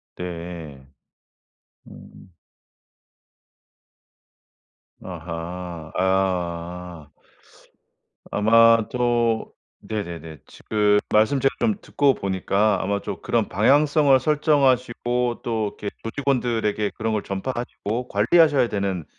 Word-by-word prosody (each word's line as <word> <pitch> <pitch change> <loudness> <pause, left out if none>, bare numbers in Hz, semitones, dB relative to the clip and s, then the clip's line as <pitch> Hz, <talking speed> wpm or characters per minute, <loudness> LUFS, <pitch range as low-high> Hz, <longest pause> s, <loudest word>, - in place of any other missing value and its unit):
네. 85 -6 -7 1.0
음. 95 - -15 2.7
아하. 85 -1 -7
아. 90 -3 -2 1.2
아마 115 +1 +4
또 120 -2 0 0.3
네네네. 85 -8 -6
지금 105 -1 +1
말씀 110 +6 +3
제가 135 +1 +1
좀 220 - +1
듣고 140 -1 +2
보니까 100 +1 0
아마 100 +1 -1
또 - - -6
그런 - - 0
방향성을 140 - +4
설정하시고 130 -4 +1
또 115 -2 -1
이렇게 105 - -3
조직원들에게 115 -5 -1
그런 110 0 -3
걸 105 - -1
전파하시고 120 +2 -4
관리하셔야 135 +4 +3
되는 95 -5 -2
105 Hz, 195 characters per minute, -23 LUFS, 90-125 Hz, 2.7 s, 아마